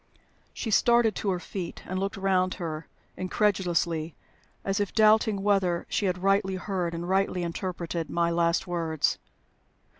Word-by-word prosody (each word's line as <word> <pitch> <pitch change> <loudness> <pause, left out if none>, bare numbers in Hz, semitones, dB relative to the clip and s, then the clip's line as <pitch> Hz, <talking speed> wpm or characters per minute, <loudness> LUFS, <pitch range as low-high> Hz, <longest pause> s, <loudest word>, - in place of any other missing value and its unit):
She 225 - -4
started 235 +1 +4
to 205 - -1
her 180 -2 0
feet, 180 -1 -6
and 185 +1 -3
looked 195 0 -2
round 185 -1 +1
her 160 -3 -5 0.3
incredulously, 175 -4 0 0.5
as 195 +1 0
if 205 -2 -2
doubting 215 -2 +4
whether 190 -4 +2
she 205 - 0
had 180 0 -2
rightly 195 -1 +2
heard 185 -3 -2
and 170 +1 -4
rightly 190 -1 +1
interpreted 170 -1 -3
my 170 0 +1
last 170 0 +1
words. 165 -4 0
185 Hz, 145 wpm, -27 LUFS, 170-195 Hz, 0.5 s, started